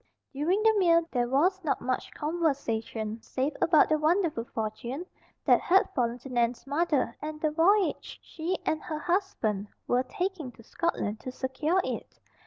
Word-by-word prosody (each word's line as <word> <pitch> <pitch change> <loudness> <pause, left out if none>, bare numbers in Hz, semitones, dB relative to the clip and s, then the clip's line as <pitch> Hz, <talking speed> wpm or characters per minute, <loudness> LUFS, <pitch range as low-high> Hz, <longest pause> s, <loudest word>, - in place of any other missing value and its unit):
During 345 +10 +1
the 445 0 +6
meal 335 -2 +4
there 245 -2 +1
was 355 +9 +2
not 305 - 0
much 255 0 -2
conversation 235 -9 -2
save 270 +6 -2
about 320 -3 +5
the 310 -1 +2
wonderful 315 -6 +1
fortune 235 +8 -4 0.4
that - - +5
had 380 +2 +3
fallen 240 -3 0
to 270 - -9
Nan's 240 -1 0
mother 285 -4 0
and 305 +1 -5
the 310 0 +1
voyage 370 +5 +2
she 345 +3 -3
and 310 - 0
her 310 - -4
husband 300 - -1 0.2
were 245 +1 +3
taking 360 -2 -3
to 230 - -16
Scotland 220 -8 -2
to 255 - -6
secure 275 +8 0
it. - - -5
300 Hz, 160 wpm, -28 LUFS, 245-340 Hz, 0.4 s, the